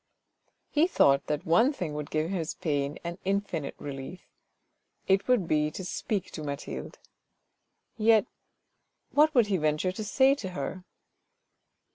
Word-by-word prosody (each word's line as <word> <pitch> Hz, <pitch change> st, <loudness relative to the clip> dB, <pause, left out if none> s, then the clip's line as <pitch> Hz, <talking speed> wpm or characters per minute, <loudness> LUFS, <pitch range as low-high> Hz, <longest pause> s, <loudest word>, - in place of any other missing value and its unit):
He 315 Hz, +3 st, +4 dB
thought 140 Hz, -, +3 dB
that 150 Hz, +3 st, -2 dB
one 180 Hz, -, +4 dB
thing 175 Hz, -, -4 dB
would 150 Hz, -1 st, -5 dB
give 155 Hz, +3 st, -1 dB
his 170 Hz, -5 st, -2 dB
pain 145 Hz, -1 st, -1 dB
an 170 Hz, +1 st, -5 dB
infinite 195 Hz, -6 st, -2 dB
relief: 140 Hz, +5 st, -7 dB, 0.8 s
it 195 Hz, 0 st, +3 dB
would 245 Hz, -9 st, +3 dB
be 150 Hz, -1 st, +2 dB
to 185 Hz, +4 st, -7 dB
speak 195 Hz, +1 st, -3 dB
to 155 Hz, -, -6 dB
Mathilde. 140 Hz, -1 st, -6 dB, 1.0 s
Yet 220 Hz, 0 st, +5 dB, 0.9 s
what 305 Hz, +1 st, +4 dB
would 240 Hz, -3 st, +6 dB
he 200 Hz, -2 st, 0 dB
venture 155 Hz, +3 st, +1 dB
to 200 Hz, +4 st, -5 dB
say 265 Hz, +6 st, +4 dB
to 215 Hz, -9 st, -5 dB
her 185 Hz, -1 st, -4 dB
180 Hz, 140 wpm, -28 LUFS, 150-210 Hz, 1.0 s, would